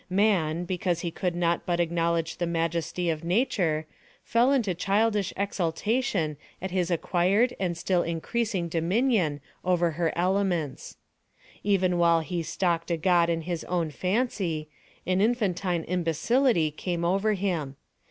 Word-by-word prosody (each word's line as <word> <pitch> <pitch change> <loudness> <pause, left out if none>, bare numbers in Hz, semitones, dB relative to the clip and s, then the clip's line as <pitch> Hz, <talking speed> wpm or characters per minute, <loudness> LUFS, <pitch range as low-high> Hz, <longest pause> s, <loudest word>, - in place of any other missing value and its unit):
Man, 180 -5 +2
because 175 -1 -1
he 170 - -3
could 180 0 -2
not 170 -1 +1
but 175 -1 0
acknowledge 170 -1 0
the 175 - -1
majesty 170 +1 -1
of 155 0 -4
Nature, 175 -5 +1 0.4
fell 240 +3 +3
into 235 -9 +2
childish 200 +2 +1
exultation 195 - -1 0.2
at 190 0 -5
his 180 -1 0
acquired 185 +8 +2
and 175 -3 -1
still 180 +1 +1
increasing 185 +3 -2
dominion 170 - +1 0.2
over 175 -2 +2
her 165 +1 0
elements. 180 -5 -1 0.7
Even 185 -3 +2
while 170 -1 +4
he 175 +1 -3
stalked 170 0 -1
a 170 - +1
God 170 0 +3
in 165 -1 0
his 170 0 -4
own 170 -3 -1
fancy, 185 - -1 0.4
an 185 +1 +1
infantine 195 -7 0
imbecility 175 - +1
came 170 +2 -3
over 195 +5 +2
him. 175 -9 -2
175 Hz, 135 wpm, -27 LUFS, 165-195 Hz, 0.7 s, while